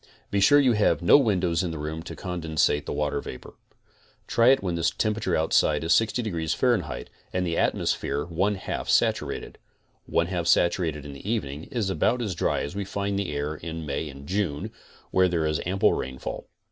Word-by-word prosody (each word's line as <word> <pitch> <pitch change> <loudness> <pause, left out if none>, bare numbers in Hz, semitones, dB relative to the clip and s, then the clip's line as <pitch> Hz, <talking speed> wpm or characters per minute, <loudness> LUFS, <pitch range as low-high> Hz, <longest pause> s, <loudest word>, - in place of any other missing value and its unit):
Be 100 - +1
sure 145 +9 +6
you 135 -3 +4
have 105 -4 +2
no 85 - +7
windows 90 -9 +1
in 90 - -2
the 80 - -5
room 75 +2 -4
to 80 - -8
condense 85 -4 0
the 75 0 -1
water 75 -1 -1
vapor. 65 - -9 0.7
Try 115 0 +3
it 135 -2 +5
when 90 -3 -1 0.2
temperature 105 -4 0
outside 75 -1 +2
is 80 +1 +3
60 115 +5 +2
deg. 105 -6 -3
F 80 +5 -2 0.7
and 90 0 -1
the 85 -1 -1
atmosphere 70 -2 0
one 95 +5 0
half - - -5
saturated, - - 0 0.5
(one 85 - +2
half 85 -2 -2
saturated 85 -4 +2
in 70 - -7
the 70 +9 -8
evening 75 -9 -3
is 115 -8 -2
about 125 +5 +1
as 105 -4 -2
dry 85 - 0
as 70 +6 -5
we 100 - -2
find 100 0 -2
the 100 -6 -2
air 75 +1 -2
in 80 +1 -6
May 75 +2 -3
and 70 0 -11
June 90 -6 -2 0.4
where 95 0 +4
there 85 -3 0
is 75 0 0
ample 95 +2 +3
rain 65 0 -4
fall). - - -6
85 Hz, 195 wpm, -26 LUFS, 75-100 Hz, 0.7 s, no